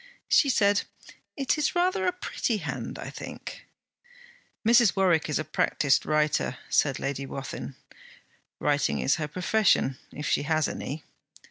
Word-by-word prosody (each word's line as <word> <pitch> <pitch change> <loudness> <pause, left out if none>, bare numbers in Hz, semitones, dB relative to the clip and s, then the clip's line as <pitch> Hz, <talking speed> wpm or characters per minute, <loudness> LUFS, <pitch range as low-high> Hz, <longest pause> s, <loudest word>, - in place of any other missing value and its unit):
She 280 - +4
said, 205 -5 +3 0.6
'It 275 +2 0
is 300 - 0
rather 370 +2 +1
a - - +3
pretty 305 -10 -2
hand, - - -5
I - - -7
think.' - - -9 1.0
'Mrs. 235 -2 +5
Warwick 180 -6 +2
is 150 - +1
a 155 - -1
practised 145 -2 +1
writer,' 150 -1 +1
said 135 -3 +3
Lady 140 0 -3
Wathin. 135 0 -6 0.8
'Writing 145 -1 +1
is 135 - +2
her 155 -2 -2
profession, 180 -5 +2
if 150 - -6
she - - +2
has 155 0 +1
any. 145 +3 -5
160 Hz, 140 wpm, -27 LUFS, 145-235 Hz, 1.0 s, Mrs